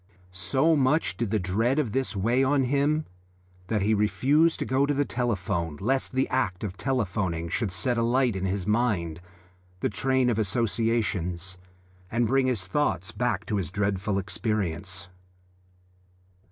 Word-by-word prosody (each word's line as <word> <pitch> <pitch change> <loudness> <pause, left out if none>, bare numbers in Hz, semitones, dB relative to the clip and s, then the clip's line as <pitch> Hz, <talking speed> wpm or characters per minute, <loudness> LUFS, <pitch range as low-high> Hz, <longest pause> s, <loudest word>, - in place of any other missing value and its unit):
So 130 - +2
much 145 +3 +2
did 115 -3 -2
the 110 - +1
dread 110 +8 +1
of 140 -8 0
this 130 -2 -1
weigh 120 +7 +2
on 135 0 +3
him 145 +4 +1 0.6
that 105 -1 0
he 110 +2 +3
refused 130 - +3
to - - -3
go 135 +2 +2
to 145 - +1
the 145 +1 +1
telephone 95 - -2
lest 130 +7 0
the 130 +1 +1
act 95 -8 -1
of 95 -3 -4
telephoning 95 -10 -1
should 100 +3 -1
set 115 +8 0
alight 120 0 +2
in 95 0 -2
his 95 -1 -1
mind 105 -7 0 0.6
the - - 0
train 130 +3 +1
of 115 - -1
associations 100 -5 -1 0.5
and 120 +2 +1
bring 130 +3 +2
his 115 -7 0
thoughts 95 - 0
back 115 -5 -1
to 105 - -1
his 90 -6 -2
dreadful 100 +1 -1
experience. 95 -2 -2
110 Hz, 155 wpm, -27 LUFS, 95-130 Hz, 0.6 s, on